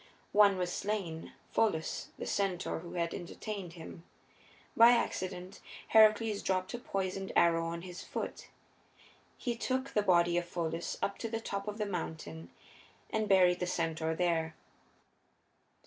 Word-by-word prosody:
One 205 -2 +6
was 180 -1 -1
slain, 190 -6 -3 0.2
Pholus, 165 -8 0
the - - -5
centaur 190 -5 -1
who 170 +1 -9
had 170 -1 -1
entertained 190 0 -6
him. 165 0 -10 0.7
By 235 +1 +8
accident 185 -5 -2 0.3
Heracles 220 -1 +5
dropped 185 0 -1
a 240 - -3
poisoned 195 -3 -3
arrow 165 -1 +4
on 170 0 -4
his 180 -1 -8
foot. - - -5 0.9
He 240 -3 -2
took 260 +3 -1
the 210 - +2
body 175 -3 +4
of 175 - -5
Pholus 170 -1 -3
up 200 - -1
to 230 - -3
the 225 0 -2
top 200 -2 -4
of 210 0 -4
the 210 - -1
mountain 155 - -5 0.6
and 220 -1 0
buried 180 -2 +5
the 180 - -1
centaur 160 -2 -1
there. 165 -2 0
185 Hz, 145 wpm, -32 LUFS, 170-210 Hz, 0.9 s, By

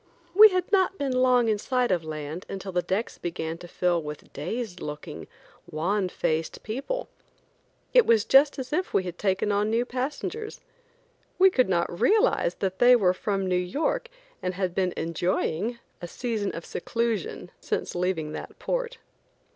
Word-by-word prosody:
We 430 +3 +10
had 370 -2 -1
not 390 -1 +3
been 280 -2 -1
long 255 -2 +4
in 215 -2 +1
sight 250 0 0
of 175 -3 +1
land 155 +2 -6
until 195 0 -5
the 180 0 +1
decks 195 +6 -2
began 165 -1 -4
to 175 - -10
fill 175 -1 0
with 150 -1 -9
dazed 180 - -4
looking, 150 0 -7 0.4
wan 185 +5 0
faced 160 -2 -2
people. 280 - -3 0.9
It - - +6
was 225 -2 +4
just 280 +4 +5
as 265 +1 -5
if 365 +4 -1
we 185 - +3
had 180 -1 -7
taken 195 +1 +1
on 205 +1 +1
new 230 +2 +1
passengers. 295 - -4 0.8
We 380 +1 +6
could 255 - +2
not 175 -1 0
realize 445 +3 +3
that 190 -1 -3
they 250 +1 +7
were 190 -6 +3
from 195 0 -2
New 185 - 0
York 230 - -1 0.3
and 180 0 -2
had 185 -2 -1
been 185 -1 0
enjoying 175 +6 -1
(?) - - -40
a 175 - -5
season 220 0 -2
of 165 - -7
seclusion 225 -4 -3
since - - -3
leaving 175 -4 -1
that - - -8
port. - - -2
200 Hz, 170 wpm, -26 LUFS, 175-255 Hz, 0.9 s, We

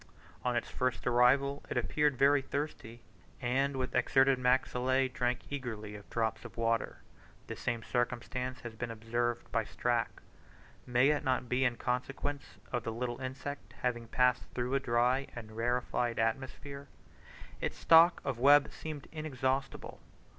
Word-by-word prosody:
On 125 -1 0
its 120 - -1
first 130 -1 -2
arrival 135 +4 +3
it - - -2
appeared 145 +3 +1
very 140 +1 +5
thirsty, 135 -5 -5 0.4
and 135 +3 0
with 130 -1 -2
exserted 135 -1 +4
maxillae 130 +1 +2
drank 125 0 0
eagerly 110 -7 -5
of 105 -1 -11
drops 110 -1 -1
of - - -11
water, 115 -1 0 0.4
this - - -7
same 115 -1 -2
circumstance 125 +1 -2
has 120 -1 -7
been 115 +1 -5
observed 120 +1 -2
by 115 - +1
Strack: 120 +1 0 0.8
may 125 +3 +4
it 150 -1 +1
not 130 -2 0
be 125 +2 +1
in 120 -2 +1
consequence 135 +3 -3 0.2
of 120 - 0
the 115 - -3
little 120 +2 -4
insect 135 +2 -6
having 120 -2 -1
passed 125 +2 +2
through 125 +1 -1
a 135 - +3
dry 125 +2 +1
and 110 -3 -8
rarefied 120 0 0
atmosphere? 135 +4 -3 0.7
Its - - -2
stock 165 +2 +6
of 130 -4 -2
web 145 +3 +6
seemed 155 -3 -7
inexhaustible. 135 -3 -3
125 Hz, 145 wpm, -32 LUFS, 120-135 Hz, 0.8 s, stock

